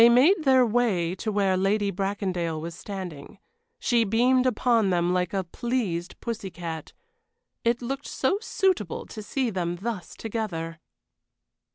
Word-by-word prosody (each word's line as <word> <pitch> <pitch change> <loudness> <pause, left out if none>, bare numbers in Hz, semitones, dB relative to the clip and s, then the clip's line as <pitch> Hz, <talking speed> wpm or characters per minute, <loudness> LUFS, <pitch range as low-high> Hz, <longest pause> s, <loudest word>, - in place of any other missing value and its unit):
They 235 - +9
made 305 +9 +5
their 260 -2 +6
way 210 -7 +1
to 215 - -2
where 200 -2 +2
Lady 200 +2 +2
Bracondale 185 -4 -1
was 165 +2 -5
standing. 185 -1 -7 0.4
She 235 -2 +2
beamed 250 +4 +3
upon 230 -3 +3
them 175 -1 +2
like 180 -1 +1
a 195 -1 0
pleased 190 -4 -2
pussy 220 -4 -4
cat. 165 -3 -6 0.7
It 235 +1 +1
looked 275 +3 -3
so 375 +10 0
suitable 375 - 0
to 215 - -8
see 245 +3 -1
them 175 -3 -1
thus 200 0 -5
together! 175 -8 -4
205 Hz, 145 wpm, -26 LUFS, 180-240 Hz, 0.7 s, They